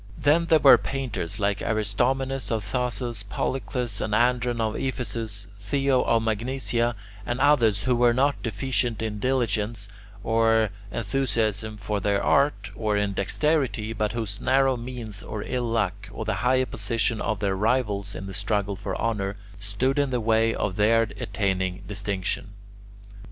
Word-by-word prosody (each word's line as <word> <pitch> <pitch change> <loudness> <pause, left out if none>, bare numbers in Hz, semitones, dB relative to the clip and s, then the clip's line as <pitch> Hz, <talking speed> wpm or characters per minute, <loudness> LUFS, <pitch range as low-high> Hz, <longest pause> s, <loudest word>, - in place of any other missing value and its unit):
Then 165 +4 +3
there 160 - +6
were 140 -3 +8
painters 120 -8 -4
like 100 0 0
Aristomenes 125 +5 0
of 110 -2 -1
Thasos, 120 -2 -2
Polycles 125 +1 -3
and 105 - 0
Andron 120 0 +2
of 110 -1 0
Ephesus, 110 -5 -3
Theo 135 +5 +1
of 115 -1 +2
Magnesia, 120 +1 0 0.3
and 120 +1 -3
others 120 -8 +4
who 125 -1 +2
were 120 0 +4
not 140 +4 +1
deficient 115 0 -1
in 105 -2 -3
diligence 110 -4 -1 0.3
or 115 -1 +3 0.2
enthusiasm 110 -2 -1
for 105 0 -2
their 100 0 +1
art 100 -9 +2
or 105 -1 0
in 105 -1 0
dexterity, 125 +1 0
but 105 -1 -1
whose 110 -4 -3
narrow 135 0 +3
means 120 -4 -6
or 105 - -5
ill 125 -1 -2
luck, 100 -2 -1
or 110 +2 -5
the 110 - 0
higher 130 +1 +3
position 115 0 -1
of 110 -3 -1
their 100 -2 0
rivals 105 -2 0
in 95 - -6
the 95 - -7
struggle 105 -1 -1
for 95 0 -4
honour, 105 -3 -1 0.2
stood 100 +8 0
in 140 -1 +2
the 125 -1 0
way 115 0 +3
of 100 -4 -2
their 115 +2 +4 0.2
attaining 95 -3 -1
distinction. 100 0 -3
110 Hz, 150 wpm, -25 LUFS, 105-125 Hz, 0.3 s, were